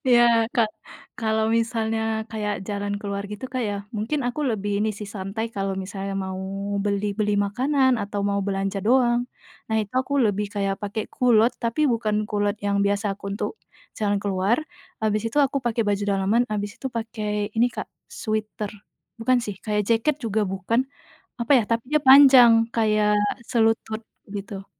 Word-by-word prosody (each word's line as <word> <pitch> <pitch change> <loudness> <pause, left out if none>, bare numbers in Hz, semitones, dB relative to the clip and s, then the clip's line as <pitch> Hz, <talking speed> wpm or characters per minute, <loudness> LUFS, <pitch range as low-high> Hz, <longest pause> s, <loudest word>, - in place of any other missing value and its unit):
ya, 240 - +6 0.3
Kak, 225 -3 +3 0.5
kalau 220 -1 +1
misalnya 225 -1 0 0.3
kayak 210 -3 -3
jalan 205 0 -2
keluar 200 -1 -3
gitu, 210 +4 -6
Kak, 255 0 -2
ya, 205 -3 -1 0.2
mungkin 245 +7 -1
aku 275 +5 -3
lebih 205 -2 -1
ini 220 - +1
santai, 205 +1 -5
kalau 195 -1 -1
misalnya 195 +1 -5
mau 190 -1 -3 0.5
beli-beli 205 +1 0
makanan 255 +5 +2
atau 200 0 -3
mau 200 0 +1
belanja 195 0 -1
doang, 240 +1 +3 0.4
nah, 220 - +1
itu 205 - -7
aku 260 +2 0
lebih 205 0 0
kayak 195 -1 0
pakai 205 +1 -3
kulot, 240 -2 +4
tapi 235 +6 +1
bukan 215 -2 0
kulot 205 0 0
yang 200 0 +1
biasa 200 0 0
aku 200 0 -7
untuk - - -2 0.5
jalan 205 -1 +1
keluar, 195 +3 +1 0.5
habis 215 -1 +1
itu 235 - -4
aku 275 +1 0
pakai 235 -2 0
baju 205 0 0
daleman, 200 +4 +2
habis 205 0 -3
itu 265 - -3
pakai 215 -3 -3
ini, 235 +2 +4
Kak, - - -6 0.2
sweter 215 -2 -3 0.5
bukan 255 +3 +3
sih, 205 -4 -5
kayak 210 -1 -1
jaket 230 +7 +2
juga 220 -1 0
bukan, 195 +7 0 0.6
apa 235 +4 +1
ya, - - +2
tapi 230 0 +1
dia 305 - +5
panjang 260 -4 +8
kayak 215 -2 +3 0.3
selutut, 225 -1 +1 0.3
gitu. 200 -1 -6
215 Hz, 160 wpm, -24 LUFS, 200-230 Hz, 0.6 s, panjang